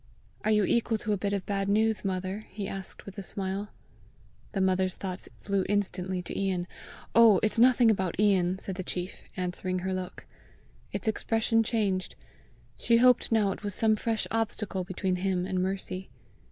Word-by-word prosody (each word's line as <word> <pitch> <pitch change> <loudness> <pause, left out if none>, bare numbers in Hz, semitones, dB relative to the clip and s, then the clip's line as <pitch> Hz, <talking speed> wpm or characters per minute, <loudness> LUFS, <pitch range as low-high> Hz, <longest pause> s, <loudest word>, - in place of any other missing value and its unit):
"Are 215 - +1
you 210 -1 +4
equal 230 +1 +1
to 215 0 -1
a - - 0
bit 200 +1 -2
of 200 -2 -2
bad 195 -1 -1
news, 220 +1 +2
mother?" 190 +2 -3
he 200 0 -5
asked 195 -1 -7
with 200 0 -8
a - - -3
smile. 195 +2 -3 0.8
The 200 - -1
mother's 185 -1 +2
thoughts 185 -1 -6
flew 200 -1 0
instantly 185 -2 -1
to - - -6
Ian. 190 -3 0 0.5
"Oh, 225 -4 +7
it's 215 +1 +2
nothing 245 -1 +6
about 190 -4 -1
Ian!" 190 -3 +3
said 190 -1 -5
the 185 - -3
chief, 180 +1 -5 0.2
answering 185 0 -2
her 190 - -1
look. 185 -1 -5 0.7
Its - - -4
expression 225 +1 +2
changed; 210 -5 -1 0.6
she 230 - +3
hoped 250 0 +4
now 210 -3 +3
it - - -6
was 205 -2 -3
some 220 -1 +3
fresh 225 +1 -1
obstacle 215 -4 -1
between 185 0 -2
him 185 -1 0
and 185 -1 -1
Mercy. 190 0 -3
195 Hz, 175 wpm, -29 LUFS, 185-215 Hz, 0.8 s, Oh